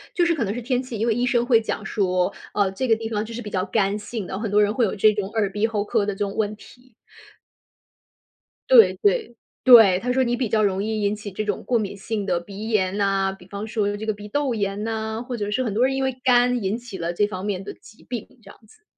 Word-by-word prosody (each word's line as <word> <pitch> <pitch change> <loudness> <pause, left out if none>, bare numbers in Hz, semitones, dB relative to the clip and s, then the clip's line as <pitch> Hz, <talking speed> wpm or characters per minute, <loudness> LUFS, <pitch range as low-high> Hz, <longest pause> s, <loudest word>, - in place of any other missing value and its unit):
就 345 - +3
是 335 -1 +2
可 270 - -1
能 200 0 -2
是 245 - -5
天 250 +1 0
气， 255 -4 -7
因 225 +3 -1
为 225 - +3
医 245 +2 0
生 240 -1 +1
会 235 -3 +5
讲 220 -1 -4
说： 185 -3 0 0.2
“呃， 200 -2 +1
这 255 +7 -3
个 225 - +4
地 225 0 -5
方 215 -1 -2
就 230 - -9
是 240 - -5
比 210 - -7
较 185 -1 -1
干 200 0 0
性 210 -1 -6
的， 190 - -5
很 220 -2 -3
多 210 +1 +4
人 205 +1 +2
会 235 -1 +2
有 200 - -2
这 215 +2 +5
种 205 -2 -3
耳 210 -3 -1
鼻 210 +2 0
喉 210 -2 -1
科 205 -1 0
的 205 - -2
这 - - -13
种 200 -1 -2
问 215 -1 -1
题。” 250 +3 -18 1.8
对- - - +8
对， 415 - +1 0.3
对， 225 -8 +8
他 250 +3 -2
说 260 +1 +2
你 240 0 0
比 250 -3 -1
较 215 -1 +2
容 195 0 +1
易 220 -1 -2
引 205 +1 +1
起 205 -1 -8
这 215 +3 -3
种 205 -2 -3
过 245 - +2
敏 200 -2 -3
性 210 0 -3
的 180 -3 0
鼻 205 +5 -8
炎 195 -2 +1
呐， 195 -1 +1
比 180 - -16
方 200 +2 -6
说 205 -2 -1
这 220 - -6
个 215 - 0
鼻 205 0 -10
窦 285 0 0
炎 205 -1 -2
呐， 220 0 -3
或 250 - -3
者 205 0 -3
是 255 +5 0
很 215 -5 -2
多 240 +4 +3
人 265 0 0
因 270 - -1
为 265 -1 -1
肝 245 -2 +3
引 200 +4 -1
起 235 -5 -9
了 170 0 -3
这 205 +3 +1
方 190 -1 -6
面 195 -2 -2
的 205 - -7
疾 215 - -19
病 240 -4 -4 0.2
这 - - -16
样 - - -15
子， 325 - -23
215 Hz, 295 characters per minute, -23 LUFS, 200-240 Hz, 1.8 s, 对